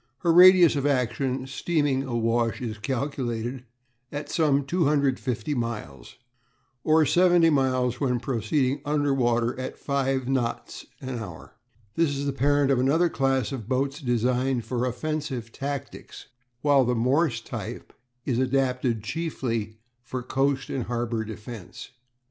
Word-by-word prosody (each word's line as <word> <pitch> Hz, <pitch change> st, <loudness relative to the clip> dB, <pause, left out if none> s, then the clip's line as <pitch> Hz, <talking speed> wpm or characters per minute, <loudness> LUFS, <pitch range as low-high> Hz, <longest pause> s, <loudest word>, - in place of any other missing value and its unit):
Her 170 Hz, -, +3 dB
radius 180 Hz, -1 st, +8 dB
of 140 Hz, 0 st, 0 dB
action, 130 Hz, 0 st, 0 dB
steaming 145 Hz, 0 st, 0 dB
awash, 115 Hz, -2 st, 0 dB
is 115 Hz, -3 st, -5 dB
calculated 125 Hz, 0 st, -3 dB, 0.5 s
at 145 Hz, +1 st, -5 dB
some 145 Hz, -4 st, +2 dB
250 140 Hz, -6 st, 0 dB
miles, 115 Hz, -, -5 dB, 0.7 s
or 155 Hz, 0 st, +4 dB
seventy 175 Hz, +2 st, +4 dB
miles 130 Hz, -3 st, +1 dB
when 125 Hz, -3 st, +1 dB
proceeding 130 Hz, +3 st, 0 dB
under 145 Hz, -1 st, +1 dB
water 120 Hz, -2 st, +1 dB
at 130 Hz, -, -5 dB
five 135 Hz, -2 st, -1 dB
knots 130 Hz, -3 st, -2 dB
an 130 Hz, -2 st, -4 dB
hour. 90 Hz, -8 st, -9 dB, 0.4 s
This 155 Hz, -4 st, +1 dB
is 140 Hz, -, -3 dB
the 140 Hz, -, -1 dB
parent 140 Hz, +1 st, +2 dB
of 130 Hz, -, +3 dB
another 155 Hz, +7 st, +3 dB
class 135 Hz, -4 st, 0 dB
of 120 Hz, -5 st, -6 dB
boats 135 Hz, +3 st, 0 dB
designed 125 Hz, 0 st, 0 dB
for 125 Hz, 0 st, -1 dB
offensive 135 Hz, -2 st, -4 dB
tactics, 140 Hz, +1 st, -6 dB, 0.4 s
while 145 Hz, -2 st, +4 dB
the 125 Hz, 0 st, 0 dB
Morse 130 Hz, +5 st, +1 dB
type -, -, -7 dB, 0.3 s
is 125 Hz, -3 st, 0 dB
adapted 125 Hz, -3 st, 0 dB
chiefly 115 Hz, -7 st, -3 dB, 0.2 s
for 125 Hz, +1 st, -5 dB
coast 135 Hz, +1 st, 0 dB
and 130 Hz, -3 st, -2 dB
harbour 120 Hz, -1 st, -2 dB
defence. 110 Hz, -1 st, -9 dB
130 Hz, 130 wpm, -26 LUFS, 120-140 Hz, 0.7 s, radius